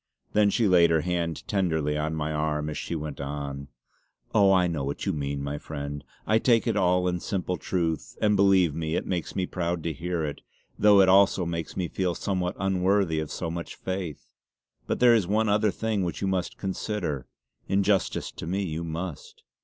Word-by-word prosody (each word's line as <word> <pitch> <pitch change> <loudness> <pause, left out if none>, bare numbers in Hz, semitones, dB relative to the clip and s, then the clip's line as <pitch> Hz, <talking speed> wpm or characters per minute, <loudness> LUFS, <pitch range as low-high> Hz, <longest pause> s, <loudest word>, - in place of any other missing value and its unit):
Then 105 -1 +4
she 110 +2 +2
laid 85 -3 +6
her 80 -1 +3
hand 85 -1 -2
tenderly 80 -7 0
on 75 +1 -1
my 75 0 -2
arm 75 0 -1
as - - -5
she 85 - -4
went 75 -3 -5
on: 70 -1 -5 0.7
"Oh, 100 -3 +5
I 95 -2 +4
know 80 -5 -2
what 70 +1 -4
you - - 0
mean, 70 -1 -3
my 70 +1 -3
friend. 70 -2 -6 0.2
I 110 +1 +3
take 115 -3 +3
it - - +1
all 90 0 +2
in 90 0 0
simple 90 -1 -2
truth; 85 -3 -2
and 105 -1 +3
believe 95 -5 +4
me 80 +1 -2
it - - -1
makes 90 -3 -3
me 95 - 0
proud 85 -2 -2
to 80 - -2
hear 85 +2 -2
it, 75 -1 -5 0.4
though 105 -1 +7
it 95 - +5
also 95 -1 +5
makes 85 -1 -4
me 90 -2 0
feel 90 0 -1
somewhat 95 -1 -2
unworthy 95 -3 +1
of 80 -1 -4
so 85 +1 -4
much 85 0 -6
faith. 95 -5 -5 0.6
But - - -1
there 120 -1 +7
is 105 -6 +2
one 110 +2 +2
other 105 +1 +3
thing 110 0 -1
which 85 - -3
you 95 - -1
must 95 -2 -1
consider. 95 - -3 0.4
In 100 +1 +2
justice 100 0 0
to - - -8
me 95 +3 -1
you 80 -2 -3
must." 85 0 -6
90 Hz, 200 wpm, -27 LUFS, 80-95 Hz, 0.7 s, though